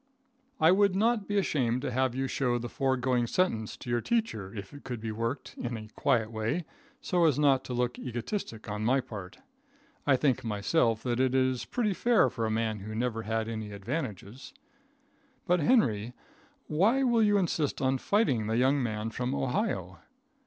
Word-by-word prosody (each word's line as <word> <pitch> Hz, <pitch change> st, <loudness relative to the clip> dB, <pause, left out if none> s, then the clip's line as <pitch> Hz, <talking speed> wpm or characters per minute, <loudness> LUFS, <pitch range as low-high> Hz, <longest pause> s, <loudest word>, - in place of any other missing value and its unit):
I 160 Hz, +2 st, +6 dB
would 200 Hz, 0 st, +4 dB
not 220 Hz, 0 st, +2 dB
be 205 Hz, -, 0 dB
ashamed 130 Hz, -9 st, +1 dB
to 135 Hz, -, -2 dB
have 130 Hz, 0 st, 0 dB
you 135 Hz, +1 st, -1 dB
show 125 Hz, -2 st, 0 dB
the 120 Hz, 0 st, -4 dB
foregoing 130 Hz, -2 st, +1 dB
sentence 115 Hz, -, 0 dB
to -, -, -12 dB
your 120 Hz, 0 st, +1 dB
teacher, 215 Hz, -, -1 dB
if 100 Hz, -2 st, -8 dB
it 145 Hz, -, -11 dB
could 125 Hz, -3 st, -5 dB
be 110 Hz, 0 st, -4 dB
worked, 115 Hz, +5 st, -3 dB
in 120 Hz, -1 st, -3 dB
a 110 Hz, -1 st, -9 dB
quiet 110 Hz, 0 st, +1 dB
way, 115 Hz, +10 st, -2 dB, 0.4 s
so 175 Hz, -3 st, +2 dB
as 150 Hz, -5 st, +3 dB
not 140 Hz, -3 st, +3 dB
to 125 Hz, -, -4 dB
look 125 Hz, 0 st, -1 dB
egotistic 120 Hz, -, -5 dB
on 105 Hz, 0 st, -3 dB
my 130 Hz, +5 st, +3 dB
part. 105 Hz, -8 st, -8 dB, 0.7 s
I 140 Hz, -, +6 dB
think 130 Hz, 0 st, +1 dB
myself 110 Hz, +2 st, +1 dB
that 120 Hz, -1 st, -1 dB
it 130 Hz, 0 st, +2 dB
is 130 Hz, -1 st, +1 dB
pretty 220 Hz, -5 st, 0 dB
fair 225 Hz, -, +3 dB
for 115 Hz, -1 st, -2 dB
a -, -, -1 dB
man 110 Hz, -1 st, -1 dB
that 110 Hz, -, -5 dB
never 115 Hz, -1 st, -1 dB
had 110 Hz, 0 st, -2 dB
any 110 Hz, -2 st, -5 dB
advantages. 115 Hz, -, -5 dB, 0.9 s
But, 180 Hz, -1 st, +3 dB
Henry, 125 Hz, -, +2 dB, 0.5 s
why 215 Hz, -, +2 dB
will 240 Hz, -3 st, +3 dB
you 205 Hz, -1 st, +4 dB
insist 165 Hz, -6 st, 0 dB
on 130 Hz, 0 st, +1 dB
fighting 135 Hz, -, +1 dB
the 110 Hz, +1 st, 0 dB
young 135 Hz, +3 st, +3 dB
man 110 Hz, -2 st, -2 dB
from 125 Hz, -, -2 dB
Ohio? 70 Hz, -1 st, -2 dB
125 Hz, 180 wpm, -29 LUFS, 110-155 Hz, 0.9 s, I